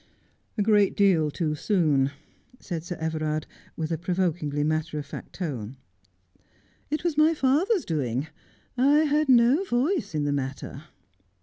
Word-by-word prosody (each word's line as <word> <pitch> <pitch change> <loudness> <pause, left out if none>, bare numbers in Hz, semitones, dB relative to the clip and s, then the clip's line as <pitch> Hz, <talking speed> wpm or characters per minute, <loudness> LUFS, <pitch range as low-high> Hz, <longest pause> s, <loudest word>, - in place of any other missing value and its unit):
' - - -43
A 210 - +2
great 205 -2 +3
deal 180 -7 +4
too 155 0 -2
soon,' 150 -6 +2 0.5
said 170 -4 -5
Sir 175 +1 -5
Everard, 155 -1 -2 0.3
with 160 0 -3
a 160 - -1
provokingly 170 -5 -1
matter 155 +1 -1
of 145 - -4
fact 140 - -9
tone. 135 - -5 0.5
' - - -36 0.2
It 305 +2 -2
was 330 -4 0
my 315 +2 +5
father's 315 - +2
doing. 135 -4 -1 0.5
I 280 +4 +4
had 300 -1 +1
no 250 +7 +5
voiee 250 - -1
in 150 - 0
the 145 0 0
matter.' 135 +1 -5
170 Hz, 150 wpm, -26 LUFS, -, 0.5 s, my